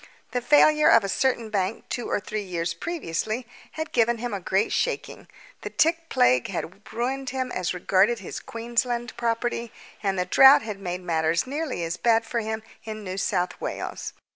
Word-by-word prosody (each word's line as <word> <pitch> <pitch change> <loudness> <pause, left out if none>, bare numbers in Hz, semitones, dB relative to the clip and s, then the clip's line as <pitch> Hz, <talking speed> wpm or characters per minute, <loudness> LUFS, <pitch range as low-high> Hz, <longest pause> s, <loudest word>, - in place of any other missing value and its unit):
The 245 - -1
failure 300 +4 +5
of 225 - +6
a - - -1
certain 235 +1 0
bank 195 +1 -2
two 240 - -4
or - - +1
three 210 +1 -4
years 170 -3 -3
previously 220 - -3 0.3
had 315 0 -4
given 235 0 +2
him 240 0 -4
a 200 - -2
great 190 +4 0
shaking. - - -2 0.3
The - - -5
tick 330 +1 +1
plague 125 0 +3
had 195 +3 -6
ruined 260 +4 -2
him 255 -1 -3
as 180 -1 -1
regarded 195 +6 +3
his - - -7
Queensland 240 +1 -2
property, 235 0 -1 0.3
and 195 -2 0
the 180 - 0
drought 265 +8 +7
had 210 -3 -5
made 180 -1 -4
matters 165 -1 +1
nearly 280 - -3
as 165 0 -3
bad 230 -1 +3
for 235 +1 -2
him 220 0 -3 0.2
in 215 -1 -6
New 185 -1 -5
South 180 -2 -1
Wales. - - -4
225 Hz, 180 wpm, -25 LUFS, 185-245 Hz, 0.3 s, drought